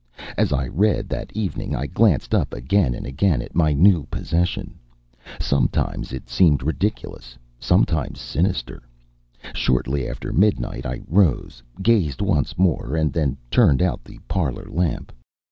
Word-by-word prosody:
As - - +1
I 65 -2 0
read, 100 +8 +1
that - - -5
evening, 105 -3 -3
I 65 - -2
glanced 90 - +2
up - - +1
again 65 +1 +1
and - - -7
again 75 +4 +1
at - - -7
my 80 -2 +3
new 80 0 +4
possession. 85 +3 -2 0.6
Sometimes 70 -2 0
it 65 -1 -7
seemed 75 0 +3
ridiculous, 70 - -3 0.2
sometimes 75 -4 +1
sinister. 85 -6 -2 0.7
Shortly 65 +2 0
after - - -5
midnight 95 - +1
I - - -5
rose, 80 -9 +1 0.2
gazed 100 -11 +2
once 90 - 0
more, 85 -6 +1
and 80 -3 0
then 70 -5 0
turned 70 +4 +4
out 90 -8 -1
the - - -14
parlor 80 -10 -2
lamp. 85 +1 -1
75 Hz, 140 wpm, -22 LUFS, 65-95 Hz, 0.7 s, new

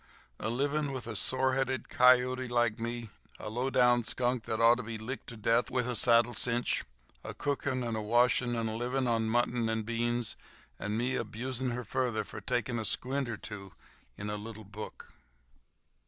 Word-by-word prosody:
"A - - -2
livin' 140 +4 0
with 130 -3 -4
a 115 -1 -5
sore 130 +4 +2
headed 130 -2 -1
kiote 125 0 +4
like 120 -2 +1
me—a 115 -2 -7
low 125 +4 -1
down 125 -2 +4
skunk 120 0 0
that 110 - -2
ought 115 +1 +6
to - - -3
be 115 +1 -5
licked 115 +5 -6
to 120 - -8
death 115 +3 +2
with 125 -1 0
a 125 - 0
saddle 120 0 +4
cinch—a 100 - -2
cookin' 140 -2 -1
and 115 -2 -2
a 110 - -2
washin' 120 +2 +3
and 115 -1 -1
a 110 - -2
livin' 125 +3 -1
on 115 -2 +1
mutton 120 0 +1
and 110 -1 -1
beans 120 0 -1 0.4
and 105 +2 -2
me 125 +3 0
abusin' 130 +2 -2
her 125 +1 -3
fur 130 +3 0 0.3
takin' 120 +2 -1
a - - -2
squint 130 +5 +1
or 110 - -3
two 100 -3 -8 0.4
in 105 - -5
a 105 - -2
little 110 +1 -8
book!" 105 +2 -9
120 Hz, 180 wpm, -31 LUFS, 110-125 Hz, 0.4 s, ought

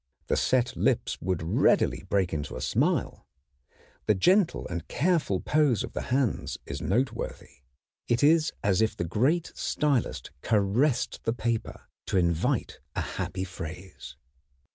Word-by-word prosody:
The - - 0
set 125 -2 +1
lips - - 0
would 90 -2 -1
readily 80 - +2
break 95 -4 +1
into 75 -2 -4
a - - -5
smile. - - 0 0.8
The 105 - +4
gentle 180 - +3
and 85 -2 -5
careful 155 - +1
pose 150 -7 +2
of - - -7
the - - -3
hands 130 -2 0
is 70 0 -5
noteworthy. 115 - -2 0.5
It 120 +3 +1
is 155 +1 +4
as 100 +1 +2
if 110 - +1
the 85 - -1
great 140 - +1
stylist 145 -6 -1
caressed 115 +6 +1
the 115 - 0
paper 115 -1 -2 0.3
to - - 0
invite 85 -2 0 0.2
a - - 0 0.2
happy 95 0 -3
phrase. 90 0 -8
110 Hz, 140 wpm, -27 LUFS, 90-135 Hz, 0.8 s, The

